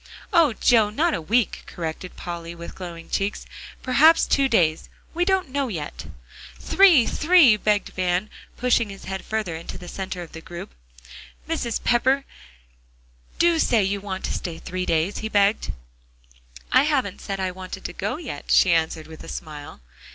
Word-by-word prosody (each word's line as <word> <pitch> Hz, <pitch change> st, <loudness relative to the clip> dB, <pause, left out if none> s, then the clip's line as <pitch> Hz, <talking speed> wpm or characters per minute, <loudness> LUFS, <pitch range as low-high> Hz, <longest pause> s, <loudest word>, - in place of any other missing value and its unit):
"Oh, 325 Hz, -7 st, +5 dB
Joe! 220 Hz, -1 st, +4 dB
not 315 Hz, +10 st, +1 dB
a -, -, -2 dB
week," 220 Hz, +6 st, +1 dB
corrected 170 Hz, +2 st, -6 dB
Polly 170 Hz, -1 st, -6 dB
with 170 Hz, 0 st, -9 dB
glowing 170 Hz, -3 st, -8 dB
cheeks, 195 Hz, +1 st, -2 dB, 0.4 s
"perhaps 305 Hz, +6 st, +5 dB
two 275 Hz, -1 st, +2 dB
days; 165 Hz, -9 st, +2 dB, 0.2 s
we 350 Hz, +1 st, +1 dB
don't 380 Hz, -5 st, +1 dB
know 280 Hz, 0 st, 0 dB
yet." 160 Hz, -10 st, -6 dB, 0.5 s
"Three 355 Hz, -11 st, +5 dB
three," 315 Hz, -8 st, +5 dB
begged 210 Hz, -1 st, 0 dB
Van, 185 Hz, +2 st, -1 dB, 0.3 s
pushing 235 Hz, -3 st, +2 dB
his 195 Hz, 0 st, -10 dB
head 190 Hz, -1 st, -5 dB
further 215 Hz, -6 st, -3 dB
into 165 Hz, -, -7 dB
the 180 Hz, -, -11 dB
center 185 Hz, -1 st, -5 dB
of 165 Hz, -, -13 dB
the 165 Hz, -, -9 dB
group. 170 Hz, +1 st, -9 dB, 0.7 s
"Mrs. 290 Hz, -8 st, -2 dB
Pepper, 260 Hz, +3 st, +2 dB, 1.1 s
do 340 Hz, -1 st, +3 dB
say 230 Hz, -8 st, +3 dB
you 200 Hz, +1 st, -1 dB
want 190 Hz, -2 st, -5 dB
to -, -, -2 dB
stay 170 Hz, -2 st, -4 dB
three 185 Hz, +2 st, -5 dB
days," 165 Hz, +4 st, 0 dB
he 220 Hz, -, -4 dB
begged. 205 Hz, 0 st, +2 dB, 1.0 s
"I -, -, +6 dB
haven't 265 Hz, -10 st, 0 dB
said 195 Hz, -1 st, -4 dB
I 190 Hz, -1 st, -1 dB
wanted 185 Hz, 0 st, -9 dB
to -, -, -4 dB
go 205 Hz, +9 st, -3 dB
yet," 270 Hz, -, -7 dB
she 180 Hz, -, +5 dB
answered 160 Hz, -1 st, 0 dB
with 160 Hz, -1 st, -11 dB
a -, -, -11 dB
smile. 150 Hz, -, -8 dB
200 Hz, 165 wpm, -23 LUFS, 175-255 Hz, 1.1 s, I